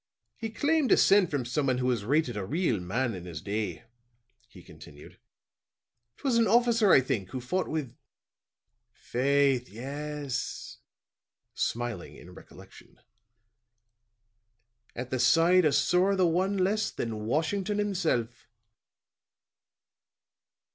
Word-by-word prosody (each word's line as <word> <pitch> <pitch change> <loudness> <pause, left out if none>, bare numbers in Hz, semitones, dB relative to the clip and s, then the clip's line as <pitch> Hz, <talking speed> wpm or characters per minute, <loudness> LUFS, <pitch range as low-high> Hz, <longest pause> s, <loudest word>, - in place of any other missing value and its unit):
"He 225 - -5
claimed 290 +4 +1
descent 195 -3 +5
from 140 -5 -2
someone 130 +1 0
who 125 - -2
was 120 -5 0
rated 135 +1 0
a 105 - -3
real 140 - -1
man 115 +7 -2
in 90 -2 -8
his 85 -3 -7
day," 105 +4 -4 0.7
he - - -15
continued. 75 0 -14 1.0
"'Twas 260 -4 0
an 230 - +3
officer, 230 -1 +3
I - - +7
think, 100 -7 -3
who 130 - -5
fought 180 +10 -2
with 145 -6 -4 1.0
faith, 135 0 0
yes," 140 +2 -5 0.7
smiling 120 -6 -3
in - - -14
recollection, - - -16 2.0
"at 125 +1 -6
the 130 - -1
side 165 +8 +4
of 150 - +3
sorra 185 +3 +2
the 185 -1 +3
one 185 +4 +1
less 200 +3 +1
than 110 -2 -5
Washington 185 - -1
himself." 165 - -1
140 Hz, 115 wpm, -28 LUFS, 120-185 Hz, 2.0 s, I